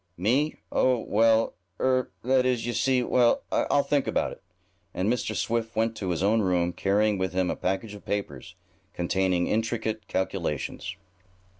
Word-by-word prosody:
"Me? 130 - +1 0.2
Oh, 130 -1 +3
well 115 0 +2 0.3
er 130 -1 +1
that 130 +1 +3
is, 125 -3 0
you 120 - -2
see; 125 +3 +2
well, 120 -1 +3
I'll 140 - +2
think 140 0 0
about - - 0
it," - - -11 0.5
and 100 +6 +1
Mr. 120 -1 -3
Swift 115 0 -1
went 115 +1 +1
to 95 - -3
his 85 0 -1
own 110 +3 +3
room, 90 -2 +1
carrying 100 +2 +1
with 95 -2 -1
him 90 -1 +1
a - - -2
package 95 +3 -2
of 105 - -11
papers, 90 -5 -4 0.4
containing 90 0 +1
intricate 110 0 -2
calculations. 90 -2 -3
110 Hz, 160 wpm, -27 LUFS, 95-120 Hz, 0.5 s, Oh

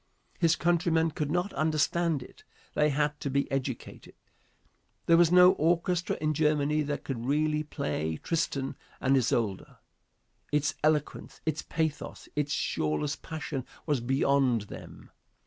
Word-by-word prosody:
His 165 -2 +4
countrymen 165 -2 +2
could 150 -1 -3
not 175 +5 -1
understand 155 -1 +1
it. - - -16 0.3
They 150 0 +3
had 150 +1 0
to 140 - -3
be 140 +1 +1
educated. 130 -3 -4 0.9
There 170 - +5
was 170 0 +5
no 180 0 +8
orchestra 175 0 +1
in 155 0 0
Germany 150 0 +2
that 145 -1 -3
could 120 -3 -4
really 150 +2 +1
play 80 - -3
"Tristan 145 -5 -1 0.2
and 135 +1 +3
Isolde." 115 -6 0 0.8
Its 145 -1 +1
eloquence, 150 -1 0
its 155 -1 -1
pathos, 160 -2 -3
its 145 -1 -1
shoreless 80 - -1
passion 155 -4 -5 0.2
was 145 -4 +1
beyond 135 -1 +2
them. - - -11
150 Hz, 130 wpm, -29 LUFS, 135-160 Hz, 0.9 s, no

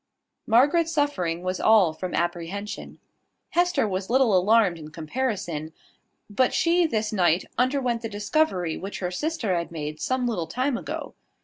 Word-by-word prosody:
Margaret's 295 +9 +4
suffering 185 - -1
was 185 0 -2
all 205 -7 +5
from 180 +3 -5
apprehension. 175 +4 -4 0.5
Hester 350 -8 +2
was 190 -1 -3
little 250 -4 +4
alarmed 190 -2 +3
in 155 -1 -9
comparison; 160 - -3 0.5
but 245 +5 +1
she 340 0 +3
this 220 -6 -1
night 175 -3 +2
underwent 250 -2 +1
the 225 - -4
discovery 205 - 0
which 195 +2 -6
her 180 -1 -3
sister 235 - -1
had 170 0 -3
made 155 -2 -5
some 255 -1 0
little 195 -9 -2
time 255 - -1
ago. - - -5
205 Hz, 145 wpm, -25 LUFS, 175-255 Hz, 0.5 s, all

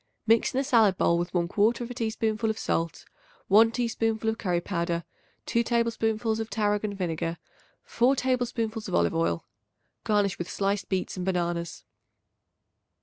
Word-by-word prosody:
Mix 225 0 +3
in 260 - 0
a - - +1
salad 225 -8 +4
bowl 170 0 +3
with 175 - -3
1/4 215 +7 +1
teaspoonful 225 -1 -1
of 220 - -2
salt, 165 -5 -2 0.4
1 220 +3 +7
teaspoonful 225 -2 0
of 225 - -7
curry 175 -3 0
powder, 170 -2 -2 0.4
2 235 - +1
tablespoonfuls 225 -1 0
of 225 0 -4
tarragon 210 -1 0
vinegar, 165 -2 -2 0.5
4 255 +3 +2
tablespoonfuls 240 -4 -1
of - - -2
olive 85 0 +2
oil. 85 0 0 0.6
Garnish 205 -3 +1
with 175 - -4
sliced 200 0 -1
beets 190 0 -2
and 180 - -3
bananas. 170 -2 -2
215 Hz, 145 wpm, -27 LUFS, 175-230 Hz, 0.6 s, 1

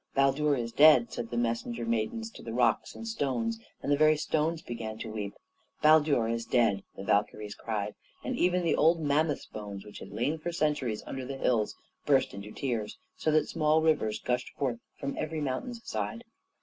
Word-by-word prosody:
"Baldur 140 +2 +3
is 115 -2 -3
dead!" 145 -4 +6
said 115 - -4
the 120 - -3
messenger 115 0 -1
maidens 115 - -1
to - - -12
the 115 -1 -6
rocks 125 - +2
and 230 - -7
stones; 125 - -1 0.2
and - - -1
the - - +6
very 155 +1 +5
stones 155 +2 0
began 110 -2 -5
to 110 0 -6
weep. 105 -2 -4 0.5
"Baldur 150 -6 +5
is 115 0 -1
dead!" 115 -5 +2
the 95 - -7
Valkyries 105 0 0
cried; 105 -2 -3 0.3
and - - -2
even 180 0 +2
the 165 - +2
old 165 +2 +4
mammoth's 150 0 +1
bones 100 -2 -8
which 105 - -10
had - - -9
lain 120 +10 -1
for 175 +3 -3
centuries 150 -9 0
under 135 -1 -5
the 135 +1 -5
hills, 115 -5 +1 0.3
burst - - +3
into 100 +1 -8
tears, 115 -6 -3 0.2
so - - -1
that 155 0 +3
small 155 0 +2
rivers 150 -9 +2
gushed 125 0 -1
forth 125 -5 -1 0.2
from 140 -1 -3
every 155 0 -2
mountain's 230 - -4
side. 235 - -3
130 Hz, 190 wpm, -30 LUFS, 115-155 Hz, 0.5 s, dead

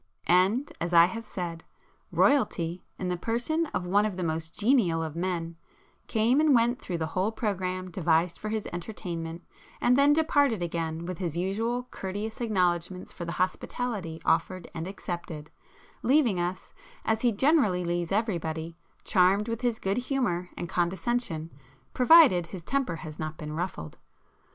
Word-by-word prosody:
And, 195 +10 +3
as 170 +1 -2
I 170 0 +9
have 225 +5 -5
said, 170 -3 -5 0.5
Royalty, 180 - +2
in 185 - -3
the 180 - -1
person 240 - 0
of 180 -10 -3
one 200 +3 +3
of 210 -4 -2
the 185 - -2
most 160 0 -3
genial 205 -8 +3
of 160 -1 -5
men, 170 -2 -2 0.5
came 235 +6 +3
and 305 -3 +5
went 240 +2 +2
through 175 - -3
the 160 - -1
whole 190 +4 +1
programme 185 -4 -2
devised 170 0 +1
for 215 - -4
his 215 -1 -2
entertainment, 175 -3 -5 0.4
and 245 - +4
then 280 +2 +5
departed 285 - +3
again 165 -1 -3
with 180 0 -5
his 170 -3 -3
usual 225 +7 -1
courteous 205 +4 -5
acknowledgments 180 -4 0
for 170 - -7
the 170 - -4
hospitality 185 -2 -2
offered 175 +2 +1
and 165 0 -4
accepted,—leaving 185 - -2
us, 175 +2 -3 0.3
as 220 0 +1
he 245 - +3
generally 215 - +3
leaves 175 0 -1
everybody, 170 -6 -1 0.3
charmed 195 +3 +3
with 230 0 -3
his 240 -3 0
good 195 -1 -1
humour 245 -9 -1
and 175 - -4
condescension, 175 -1 -1 0.4
provided 255 - +6
his 175 0 -8
temper 275 -5 -1
has 155 -1 -9
not 155 0 -4
been 150 -2 -6
ruffled. 160 - -5
185 Hz, 155 wpm, -28 LUFS, 170-230 Hz, 0.5 s, I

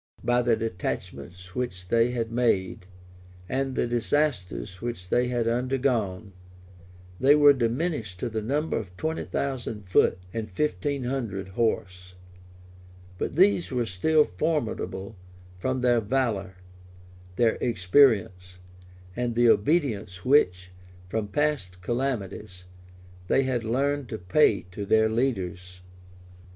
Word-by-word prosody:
By 120 +1 +2
the 120 -1 +2
detachments 90 -5 -5
which 95 -7 -4
they 115 +1 +3
had 115 -2 -3
made, 110 -5 0 0.6
and 135 +2 -2
the - - +1
disasters 120 - -1
which 115 -7 -5
they 125 +5 +2
had 120 -2 -1
undergone, 115 -6 -1 0.9
they 140 +3 +6
were 145 -1 +7
diminished 120 - -2
to - - -1
the 110 -1 -3
number 145 +8 -1
of 90 -4 -10
twenty 160 +6 -2
thousand 120 -7 -4
foot 90 - +3 0.2
and 110 -2 -4
fifteen 145 +5 -1
hundred 115 -7 -3
horse; 90 -4 -2 1.0
but - - -3
these 185 0 +4
were 125 -3 -1
still 150 +11 +3
formidable 115 -10 -3 0.4
from 130 +5 -1
their 120 -2 +3
valor, 105 -5 -1 0.8
their 115 +2 +2
experience, 95 -4 +2 0.6
and 120 -1 -2
the 120 0 +4
obedience 105 - +1
which, 90 -10 +3 0.4
from 110 +1 -2
past 125 -8 -1
calamities, 105 -6 -3 0.6
they 135 - +3
had 130 -3 -1
learned 135 +4 -1
to 110 - -4
pay 100 +3 +3
to 100 +2 -5
their 110 +2 +3
leaders. 95 -7 -2
115 Hz, 120 wpm, -26 LUFS, 95-130 Hz, 1.0 s, were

